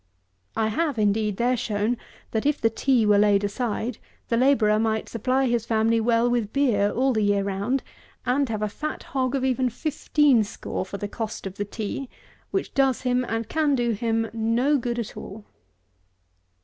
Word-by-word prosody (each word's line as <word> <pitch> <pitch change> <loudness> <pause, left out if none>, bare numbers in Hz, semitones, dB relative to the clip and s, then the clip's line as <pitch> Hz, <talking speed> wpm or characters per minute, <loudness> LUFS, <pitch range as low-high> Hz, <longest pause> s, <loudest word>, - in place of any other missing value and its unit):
I 220 -1 +1
have, 290 +3 -1
indeed, 210 -1 +1
there 245 +2 +2
shown, 220 0 -1 0.4
that 220 - -1
if 295 0 +1
the 225 - +2
tea 245 -1 +2
were 205 -1 +5
laid 205 -1 +4
aside, 225 +2 -2 0.3
the 230 - +2
labourer 230 -4 +4
might 220 0 0
supply 255 +4 0
his 240 -3 +1
family 225 0 +2
well 230 +1 +3
with 240 -4 0
beer 230 -8 +2
all 260 +4 +1
the 220 - +1
year 205 -1 +2
round, 200 +7 -1 0.4
and 260 +2 +1
have 215 -1 -2
a - - +1
fat 305 +9 -5
hog 260 -1 -1
of 265 -1 0
even 255 -1 +1
fifteen 290 -1 +2
score 200 -2 -5
for 200 - -5
the 205 - -4
cost 220 0 -5
of 195 - -4
the 205 - -2
tea, 220 +5 -5 0.4
which 390 -1 -2
does 270 -2 +2
him 250 0 +1
and 225 -1 -3
can 305 -3 +1
do 240 -2 +1
him 225 +1 0
no 230 +6 +2
good 240 0 -2
at 235 -3 -4
all. 210 +1 -9
230 Hz, 185 wpm, -25 LUFS, 215-255 Hz, 0.4 s, were